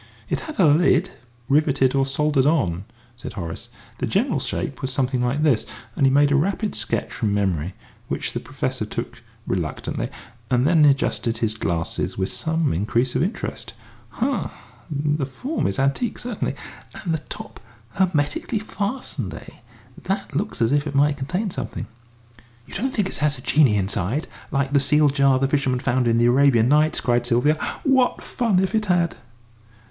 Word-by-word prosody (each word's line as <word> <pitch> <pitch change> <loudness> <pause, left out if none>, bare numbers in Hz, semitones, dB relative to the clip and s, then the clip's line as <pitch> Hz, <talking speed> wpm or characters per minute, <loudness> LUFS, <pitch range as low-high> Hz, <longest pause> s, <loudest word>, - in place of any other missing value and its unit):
"It - - +1
had 310 - -8
a 185 - +6
lid, 165 +4 +4 0.4
riveted 140 -2 +3
or 135 -1 +2
soldered 140 0 +2
on," 95 - +1 0.3
said 120 - -8
Horace; 85 -5 -6 0.3
"the - - -1
general - - +1
shape - - -3
was 130 - -2
something 130 -1 0
like 130 +5 0
this 140 -8 +3 0.2
..." 115 -1 -24
And 135 - +3
he - - +4
made 145 +1 +4
a - - +4
rapid 195 +8 0
sketch - - -2
from 105 -5 0
memory, 95 -3 -1 0.3
which - - -3
the - - -2
Professor - - -3
took - - -5 0.2
reluctantly, - - -3 0.4
and 125 0 +2
then 155 -1 +5
adjusted 135 -4 +2
his 115 -2 0
glasses 85 -6 -2
with 95 0 0
some 160 -2 0
increase 115 +8 0
of 130 - +2
interest. 190 +8 -3 0.4
"Ha 255 +2 -1 0.4
the 145 -1 -1
form 260 - -2
is 95 - -2
antique, 140 - 0
certainly. 240 -4 -3 0.4
And 170 -4 -3
the 160 - 0
top - - -8 0.3
hermetically 180 - 0
fastened, 205 - -4
eh? - - -11 0.5
That 195 -5 -3
looks 175 - -1
as 115 - +2
if 145 +1 +2
it 145 - -5
might 145 +1 +3
contain 180 +10 -2
something." - - -5 0.8
"You - - -14
don't 255 +8 -1
think 210 -6 0
it - - -3
has 150 -2 +1
a - - -11
genie 135 -8 +4
inside, 100 - -1 0.2
like 140 0 0
the 140 - +5
sealed 145 +1 +4
jar 140 -2 +4
the 135 +1 +1
fisherman 135 -3 +1
found 125 -1 +1
in 115 0 +3
the 120 - +4
'Arabian 120 -2 +4
Nights'?" 150 +3 +3
cried 120 -1 +2
Sylvia. 125 +5 +3 0.3
"What 265 -3 +2
fun 230 -6 0
if 190 +2 +1
it 220 -1 +1
had!" 175 -2 +2
140 Hz, 175 wpm, -23 LUFS, 125-165 Hz, 0.8 s, a